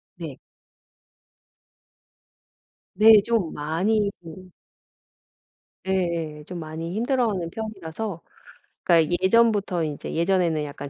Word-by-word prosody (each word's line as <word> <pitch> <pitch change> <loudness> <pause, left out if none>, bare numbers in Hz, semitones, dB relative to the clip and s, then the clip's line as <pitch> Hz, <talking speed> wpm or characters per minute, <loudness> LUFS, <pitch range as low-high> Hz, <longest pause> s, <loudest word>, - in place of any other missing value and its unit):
네. - - -8 2.6
네 220 0 +8
좀 225 -8 0
많이 200 +8 0
그 180 +2 -12 1.4
예예. 170 -5 -2
좀 180 +1 -7
많이 160 +2 -6
힘들어하는 225 -7 0
편이라서. 200 -3 -6 0.6
그니까 170 -1 +3
예전부터 200 -3 +3
인제 150 -2 -5
예전에는 170 -2 +1
약간 145 -1 -7
180 Hz, 195 characters per minute, -24 LUFS, 160-210 Hz, 2.6 s, 네